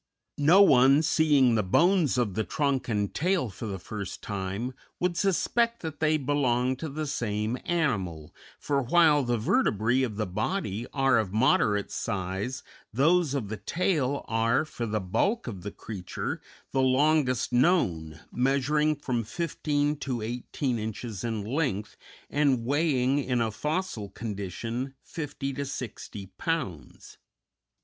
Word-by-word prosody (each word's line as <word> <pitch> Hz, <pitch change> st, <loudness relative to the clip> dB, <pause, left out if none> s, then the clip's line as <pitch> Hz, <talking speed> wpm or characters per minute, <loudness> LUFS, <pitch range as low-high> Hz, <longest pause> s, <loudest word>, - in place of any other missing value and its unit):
No 170 Hz, +8 st, +7 dB
one, 135 Hz, -2 st, +6 dB
seeing 150 Hz, -6 st, +4 dB
the 110 Hz, -, +3 dB
bones 160 Hz, -, +3 dB
of 115 Hz, -6 st, +1 dB
the 110 Hz, -, 0 dB
trunk 135 Hz, -1 st, -1 dB
and 105 Hz, -3 st, -1 dB
tail 175 Hz, -, 0 dB
for 110 Hz, +4 st, -7 dB
the 100 Hz, -2 st, -4 dB
first 100 Hz, +1 st, -7 dB
time, 100 Hz, +5 st, -3 dB, 0.3 s
would 180 Hz, -1 st, 0 dB
suspect 230 Hz, +5 st, +1 dB
that 155 Hz, -2 st, -5 dB
they 155 Hz, 0 st, +3 dB
belonged 130 Hz, -3 st, +1 dB
to 160 Hz, -, -4 dB
the 155 Hz, +2 st, -3 dB
same 115 Hz, -4 st, -2 dB
animal, 95 Hz, -, -1 dB, 0.2 s
for 140 Hz, -1 st, 0 dB
while 150 Hz, +2 st, +4 dB
the 120 Hz, -2 st, 0 dB
vertebræ 110 Hz, +3 st, +2 dB
of 115 Hz, -5 st, -2 dB
the 110 Hz, +1 st, -1 dB
body 110 Hz, -, -2 dB
are 135 Hz, -4 st, +3 dB
of 105 Hz, -4 st, -2 dB
moderate 105 Hz, -2 st, +2 dB
size, 100 Hz, +5 st, -3 dB, 0.3 s
those 155 Hz, +4 st, +3 dB
of 115 Hz, -8 st, -2 dB
the 110 Hz, -, -4 dB
tail 150 Hz, -, -1 dB
are, 115 Hz, +6 st, +2 dB
for 120 Hz, -6 st, -5 dB
the 110 Hz, 0 st, -1 dB
bulk 195 Hz, -, 0 dB
of 100 Hz, -3 st, -6 dB
creature, 95 Hz, -5 st, -5 dB, 0.3 s
the 135 Hz, -, +1 dB
longest 130 Hz, -2 st, +2 dB
known, 85 Hz, -, +2 dB
measuring 140 Hz, +4 st, +2 dB
from 125 Hz, -5 st, -2 dB
fifteen 150 Hz, +2 st, -1 dB
to 130 Hz, -5 st, -3 dB
eighteen 120 Hz, +2 st, -2 dB
inches 110 Hz, -1 st, -5 dB
in 115 Hz, -3 st, -2 dB
length, 115 Hz, -5 st, -2 dB, 0.3 s
and 140 Hz, -5 st, +1 dB
weighing 140 Hz, -1 st, +2 dB
in 125 Hz, -3 st, 0 dB
a 115 Hz, -1 st, 0 dB
fossil 150 Hz, -, -3 dB
condition 115 Hz, +6 st, -5 dB
fifty 140 Hz, -3 st, -5 dB
to 140 Hz, -, -3 dB
sixty 115 Hz, -6 st, -6 dB
pounds. 125 Hz, -, -4 dB
130 Hz, 140 wpm, -28 LUFS, 110-150 Hz, 0.3 s, No